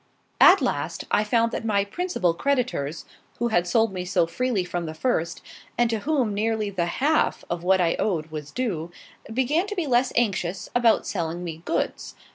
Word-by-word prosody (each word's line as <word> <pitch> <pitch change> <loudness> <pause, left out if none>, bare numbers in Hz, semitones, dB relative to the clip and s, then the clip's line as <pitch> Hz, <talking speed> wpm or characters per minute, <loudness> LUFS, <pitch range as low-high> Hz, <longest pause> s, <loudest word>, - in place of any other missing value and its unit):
At - - +7
last, - - -2
I 210 - +3
found 230 +2 +2
that - - -4
my 200 -3 +1
principal 205 - -1
creditors, 240 - -1 0.3
who 240 0 0
had 175 -5 +1
sold 220 +3 +2
me 180 -1 -3
so 180 -1 +2
freely 235 +2 -1
from 175 -1 -3
the 160 - -6
first, 170 -4 -1 0.3
and 240 -1 +2
to 225 - 0
whom 260 -4 0
nearly 215 0 -1
the 175 -3 -1
half 305 +4 +1
of 175 0 -3
what 190 +1 +3
I 170 -2 +2
owed 165 -7 -1
was 150 -2 -6
due, 175 -9 -3 0.4
began 275 - +1
to 415 - -4
be 355 -4 -1
less 250 -1 +2
anxious 190 -5 -1
about 240 -2 +3
selling 170 -2 -3
me 165 -3 -5
goods. - - -2
205 Hz, 185 wpm, -25 LUFS, 175-245 Hz, 0.4 s, At